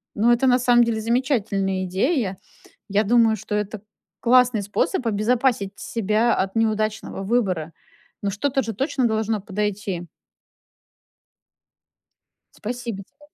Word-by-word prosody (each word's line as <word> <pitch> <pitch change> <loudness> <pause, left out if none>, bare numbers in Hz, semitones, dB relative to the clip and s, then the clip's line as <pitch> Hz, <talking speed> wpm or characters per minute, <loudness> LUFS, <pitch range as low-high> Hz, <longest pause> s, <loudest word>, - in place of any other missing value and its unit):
Ну, 230 +3 +3
это 240 +3 +3
на 250 0 +4
самом 240 -1 +5
деле 230 -2 -1
замечательная 220 -6 0
идея. 195 - 0 0.5
Я 205 +2 +2
думаю, 225 0 +4
что 210 0 -5
это 210 0 -3 0.4
классный 250 -2 +4
способ 210 - -1
обезопасить 220 -1 +1
себя 220 +3 +1
от 190 +2 -2
неудачного 215 -2 -1
выбора. 190 -8 0 0.5
Ну, 200 - -1
что-то 270 +7 0
же 225 0 -4
точно 265 +3 0
должно 220 -1 -1
подойти. 200 -3 -3 2.5
Спасибо 235 -3 -5
тебе. 280 - -42
220 Hz, 115 wpm, -23 LUFS, 200-240 Hz, 2.5 s, самом